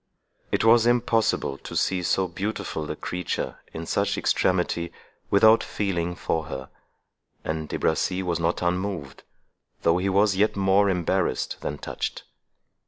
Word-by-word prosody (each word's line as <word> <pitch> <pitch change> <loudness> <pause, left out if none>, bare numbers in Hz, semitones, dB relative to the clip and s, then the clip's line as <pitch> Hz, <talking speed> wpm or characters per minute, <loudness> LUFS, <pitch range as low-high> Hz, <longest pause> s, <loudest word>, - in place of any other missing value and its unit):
It - - +1
was 115 +1 +6
impossible 115 - +1
to - - -9
see 95 -1 +1
so 95 +2 +1
beautiful 95 -4 -4
a - - -2
creature 90 -1 -4
in 80 +1 -6
such 100 +4 0
extremity 90 -2 +1 0.4
without 110 +3 +6
feeling 90 -4 -2
for 80 -2 -2
her, 65 -4 -7 0.7
and 80 -1 -3
De - - -2
Bracy 90 +4 0
was 85 -2 -1
not 85 +2 0
unmoved, 90 -6 -2 0.6
though 85 +2 +3
he 95 +2 0
was 100 +1 +3
yet 105 +3 +2
more 100 +1 +3
embarrassed 90 -3 0
than 75 - -3
touched. - - -4
90 Hz, 140 wpm, -25 LUFS, 85-100 Hz, 0.7 s, was